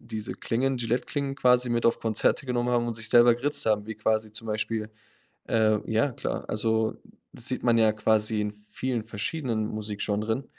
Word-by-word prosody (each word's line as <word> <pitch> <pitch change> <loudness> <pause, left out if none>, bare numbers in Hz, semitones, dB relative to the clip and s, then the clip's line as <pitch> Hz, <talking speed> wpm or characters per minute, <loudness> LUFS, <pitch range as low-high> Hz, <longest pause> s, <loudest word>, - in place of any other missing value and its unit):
diese 110 -1 -5
Klingen, 130 +3 -1
Gilette-Klingen 125 +4 -2
quasi 125 -1 +4
mit 120 0 +1
auf 115 - +2
Konzerte 115 +4 +1
genommen 125 -1 0
haben 120 -1 +1
und 115 -1 -3
sich 110 -1 -4
selber 120 0 +7
geritzt 140 +5 0
haben, 105 -1 +1
wie 110 - -5
quasi 110 0 0
zum 115 +1 -5
Beispiel 110 0 -2 0.6
ähm, 110 -2 +2
ja 115 +5 +1
klar. - - -4
Also, 110 +1 0 0.4
das 120 - -6
sieht 130 - -3
man 120 -1 +4
ja 110 -1 +5
quasi 110 0 +1
in 105 0 -2
vielen 110 +3 -4
verschiedenen 110 0 -2
Musikgenres. 110 +3 -2
115 Hz, 175 wpm, -27 LUFS, 110-120 Hz, 0.6 s, selber